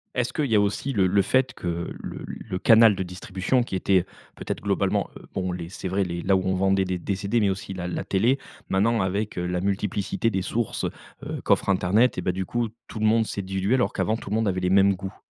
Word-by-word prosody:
Est-ce 125 -1 -1
qu'il 150 - 0
y 115 -4 +1
a - - +6
aussi 105 +7 -1
le 95 -3 +3
le 100 +2 +3
fait 130 +5 +1
que 85 -1 -4
le - - -6
le 95 -4 -5
canal 110 -2 +7
de 95 - -2
distribution, 95 +6 -1
qui 100 - -5
était, 95 0 +2 0.3
peut-être, - - -5
globalement, - - 0
heu, - - -14
bon 95 -1 -2
les 85 -1 -5
c'est 95 - -6
vrai 95 +2 +1
les 85 -1 -4
là 95 0 +3
où 95 - +2
on 95 0 +1
vendait 95 0 +2
des 90 -1 -2
des 95 +3 -2
CD, 100 +4 0
mais 100 -2 +3
aussi 95 0 -4
la 90 -1 -4
la 90 - -3
télé, 115 +8 +2 0.3
maintenant 110 +3 +2
avec, 100 +2 -2
heu, 90 - -1
la 90 0 -1
multiplicité 100 +3 -1
des 95 -3 -1
sources, 115 +3 -2 0.4
heu, - - -5
qu'offre - - +2
internet, 100 +6 +3
et - - -1
bah, 90 - 0
du 95 +1 -3
coup, 120 -2 -1 0.2
tout 110 - -7
le 110 - +1
monde 110 +1 +4
s'est 100 - -3
dilué, 95 +4 0
alors 125 - +1
qu'avant 110 +1 0
tout 100 - -9
le 105 - 0
monde 110 -1 +1
avait 95 -1 0
les 90 - +1
mêmes 100 +1 +5
goûts? 95 +1 -7
95 Hz, 250 wpm, -25 LUFS, 95-110 Hz, 0.4 s, canal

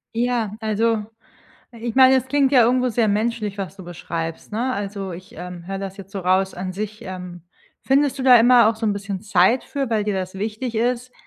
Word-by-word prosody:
Ja, 235 -3 0
also, 220 0 0 0.7
ich 235 -1 -5
meine, 260 +1 +6
es 260 -1 +1
klingt 275 0 +2
ja 260 -3 +6
irgendwo 250 +2 +2
sehr 230 -1 +1
menschlich, 210 -1 -1
was 195 0 -5
du 195 - -11
beschreibst, 165 -1 -6
ne? 245 +5 -1
Also, 200 -3 -4
ich, 185 +3 -11
ähm, 175 0 -8
höre 195 0 -4
das 195 0 -6
jetzt 195 -1 -11
so 200 - -4
raus 190 +1 +1
an 185 +1 -5
sich, 215 +2 -6
ähm, 180 -2 -8 0.4
findest 275 +1 +2
du 265 - -3
da 255 -1 +8
immer 240 -1 +6
auch 225 - +1
so 220 0 -2
'n 205 - +1
bisschen 200 -2 -5
Zeit 200 +4 +3
für, 275 0 -3
weil 215 -2 +1
dir 205 -1 -1
das 185 -1 -4
wichtig 220 +5 -4
ist, 245 +2 -1
215 Hz, 215 wpm, -22 LUFS, 190-245 Hz, 0.7 s, da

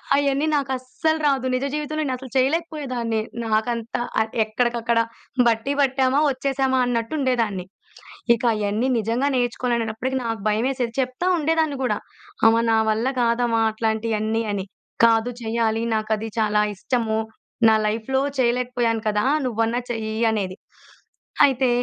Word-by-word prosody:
అయన్నీ 280 +1 +1
నాకస్సలు 265 +3 -1
రాదు. 270 -2 +1
నిజ 255 +2 -1
జీవితంలో 305 +1 -2
నేనసలు 260 0 -5
చేయలేకపోయేదాన్ని. 265 -5 0 0.3
నాకంతా 225 +2 -1 0.2
ఆహ్, 220 - -2
ఎక్కడికక్కడ 235 +1 0 0.5
బట్టీ 230 +4 +1
పట్టామా, 265 0 +2
వచ్చేశామా 265 0 0
అన్నట్టు 230 +1 -1
ఉండేదాన్ని. 230 -9 0 0.7
ఇక 230 - -10
అయన్నీ 210 +3 0
నిజంగా 230 +5 0
నేర్చుకోవాలనేటప్పటికి 245 0 -1
నాకు 225 -2 -3
భయమేసేది. 240 +2 -1
చెప్తా 255 +6 -3
ఉండేదాన్ని 315 -2 +1
కూడా 250 - +1 0.5
అమ్మ 225 0 +5
నా 225 - +4
వల్ల 220 +3 +1
కాదమ్మా 235 -1 +2
అట్లాంటియన్నీ 220 0 -1
అని. 195 -2 -3 0.4
"కాదు 225 +1 +3
చెయ్యాలి. 225 0 0
నాకది 220 0 -1
చాలా 210 -1 +2
ఇష్టము. 225 +1 -1 0.5
నా 220 - +5
లైఫ్‌లో 230 +5 0 0.2
చేయలేకపోయాను 240 -2 +1
కదా, 210 +1 0 0.2
నువ్వన్నా 230 0 0
చెయ్యి" 220 -1 -3
అనేది. 195 -3 -2 0.9
అయితే 260 -1 +1
235 Hz, 120 wpm, -23 LUFS, 220-260 Hz, 0.9 s, అమ్మ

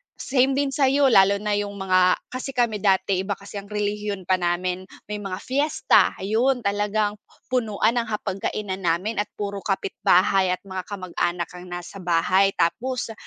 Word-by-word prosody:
same 265 0 +1
din 280 0 0
sa'yo 275 0 +3
lalo 195 -2 +6
na 210 - -1
yung 205 0 -4
mga 185 -2 +3 0.2
kasi 255 +1 -5
kami 235 -4 +1
dati 190 -1 +2
iba 195 +2 -2
kasi 200 +1 -8
ang 200 - -12
relihiyon 210 -1 -3
pa 185 +1 +1
namin, 180 +1 -1 0.2
may 210 - -3
mga 195 -2 -6
fiesta 285 +4 +2
ayun 235 +6 0
talagang 205 +1 0 0.3
punuan 225 -1 +1
ng 230 - -3
hapagkainan 200 -2 -3
namin 185 +5 -1
at 205 - 0
puro 200 -1 -4
kapitbahay 190 -1 +2
at - - -26
mga 190 -2 -6
kamag-anak 175 -3 -2
ang 180 0 -10
nasa 175 +2 -7
bahay. 185 +3 +3
Tapos, 245 +7 -1
200 Hz, 160 wpm, -24 LUFS, 185-220 Hz, 0.3 s, lalo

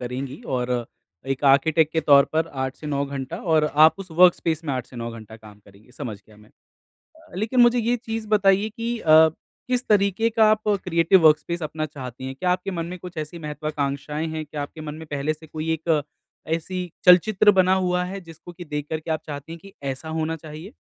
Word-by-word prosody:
करेंगी 130 +3 -5 0.2
और 125 0 -2 0.6
एक 135 +2 -5
आर्किटेक्ट 150 +3 +4
के 160 - +1
तौर 140 -2 +6
पर 160 +1 +1 0.2
8 130 0 -5
से 155 - -10
9 140 -1 -1
घंटा 140 +3 -5 0.2
और 155 -1 +4 0.2
आप 160 - +6
उस 190 -2 -9
वर्कस्पेस 165 -1 +3
में 145 - -2
8 125 -2 -4
से 125 - -14
9 115 0 -4
घंटा 110 -1 -11
काम 105 -2 -15
करेंगी, 100 +4 -20
समझ 115 -4 -6
गया 110 - -19
मैं। 105 +1 -20 0.5
अ, 320 -1 -22
लेकिन 220 +6 +1
मुझे 240 0 +5
ये 235 +2 +1
चीज़ 225 -2 -5
बताइए 200 0 +3
कि 230 +2 -4
अ, 160 -4 +6 0.4
किस 250 0 -1
तरीके 205 +2 +2
का 225 0 +3
आप 215 0 0 0.2
क्रिएटिव 170 +1 +4
वर्कस्पेस 155 +3 +2
अपना 155 0 -3
चाहती 130 -3 -8
हैं? 130 - -5
क्या 180 +6 0
आपके 180 +2 -1
मन 170 -3 -3
में 180 +1 -7
कुछ 180 0 -10
ऐसी 155 +2 -6
महत्वाकांक्षाएँ 150 -1 -3
हैं? 160 0 -4
क्या 145 0 -5
आपके 150 +2 -9
मन 150 -1 -6
में 160 +1 -10
पहले 145 +2 -1
से 160 +1 -15
कोई 155 +1 -3
एक 160 -1 0 0.5
ऐसी 180 +2 -5 0.2
चलचित्र 190 +3 +6
बना 185 0 +4
हुआ 180 -1 0
है 195 +2 -6
जिसको 165 0 -13
की 175 +1 -10
देख 150 -2 -4
कर 160 - -2
के 160 - -8
आप 160 0 -1
चाहती 145 +1 -7
हैं 165 - -8
कि 195 +2 -14 0.2
ऐसा 135 +4 -10
होना 160 0 -2
चाहिए? 160 +5 -10
160 Hz, 215 wpm, -23 LUFS, 145-185 Hz, 0.6 s, तौर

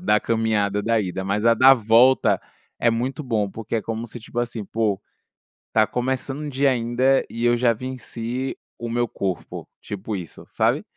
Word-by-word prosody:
da 105 - +3
caminhada 105 -3 0
da 115 0 +2
ida 95 -1 -3
mas 105 +3 0
a 115 - +6
da 130 +4 +8
volta 115 -3 +4 0.4
é 115 - +3
muito 125 +5 -2
bom 110 -6 -1
porque 115 +2 -4
é 110 - -2
como 115 +2 -4
se, 120 - -9
tipo 115 +2 -7
assim: 120 -2 -2
"Pô, 105 -3 0 0.7
tá 110 -1 +4
começando 130 +3 -2
o 150 - -4
dia 140 +1 +2
ainda 125 +2 +2
e 115 +1 -5
eu 120 0 +4
já 120 0 +3
venci 125 +1 -5 0.2
o 120 - -5
meu 120 +1 0
corpo." 95 -4 -4
Tipo 105 +1 -5
isso 90 -4 -8
sabe? - - +1
115 Hz, 180 wpm, -23 LUFS, 110-125 Hz, 0.7 s, da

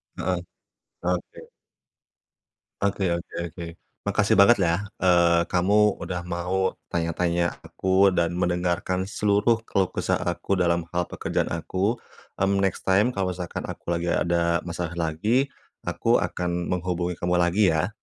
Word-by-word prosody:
Heeh, 90 0 -1 0.6
oke. 90 0 -3 1.3
Oke 100 0 0
oke 85 - -11 0.2
oke. 85 +2 -9 0.4
Makasih - - +2
banget, 110 +5 +7
ya, 85 +3 +1 0.2
eee, 85 -2 +4
kamu 100 +3 +3
udah 90 -1 -4
mau 95 +2 -1 0.2
tanya-tanya 85 +1 0
aku 95 +1 +3
dan 85 -2 +2
mendengarkan 90 +1 0
seluruh 105 +2 +2
keluh 95 -4 +1
kesah - - 0
aku 90 +2 -2
dalam 85 -1 +1
hal 90 0 -1
pekerjaan - - -2
aku. 95 +7 -1 0.4
Mmm, 100 0 +2
next 95 -2 -1
time 100 +5 +4
kalau 95 -6 -1
misalkan 90 -1 -5
aku - - -8
lagi 85 0 -1
ada 85 0 +1
masalah 85 -1 -4
lagi, 105 - +1 0.4
aku - - +2
akan 90 -1 -2
menghubungi 90 -1 -2
kamu 90 0 0
lagi, 85 +1 +3
ya. 80 +4 +1
90 Hz, 135 wpm, -25 LUFS, 85-95 Hz, 1.3 s, banget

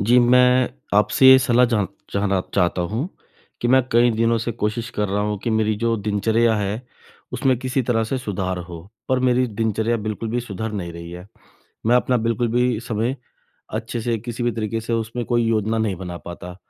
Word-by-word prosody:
जी, 120 +5 +4
मैं 125 +1 +4 0.2
आपसे 105 +5 +4
ये 130 - +9
सलाह 125 -1 +3
जा 105 -3 +2 0.3
जानना 100 -1 +1
चाहता 90 -2 +1
हूँ 130 +10 -2 0.5
कि 120 - 0
मैं 130 +1 +5
कई 120 +1 +5
दिनों 115 +1 +1
से 115 +1 -3
कोशिश 115 +2 -2
कर 105 -1 -2
रहा 100 +1 0
हूँ 105 0 -2
कि 115 - 0
मेरी 110 -1 +1
जो 115 0 +2
दिनचर्या 110 +2 +1
है 105 +3 -2 0.5
उसमें 130 -1 +1
किसी 130 +1 -1
तरह 115 -2 +1
से 130 +4 -2
सुधार 95 -6 -3
हो। 85 -2 -8 0.3
पर 130 - +2
मेरी 125 +1 +2
दिनचर्या 110 +1 -1
बिल्कुल 110 +1 -4
भी 120 +2 0
सुधर 110 -1 -5
नहीं 90 -5 -4
रही 85 0 -9
है। 90 +1 -9 0.6
मैं 120 +2 +4
अपना 125 0 +2
बिल्कुल 115 +1 0
भी 125 -1 +1
समय 115 +2 -2 0.6
अच्छे 115 +1 -3
से 115 0 -1
किसी 120 +2 -5
भी 120 - +1
तरीके 115 0 -3
से 115 +1 -3
उसमें 115 +1 -2
कोई 120 -1 +1
योजना 110 0 +1
नहीं 110 -4 0
बना 90 -1 -6
पाता। 90 +1 -8
115 Hz, 200 wpm, -22 LUFS, 105-120 Hz, 0.6 s, ये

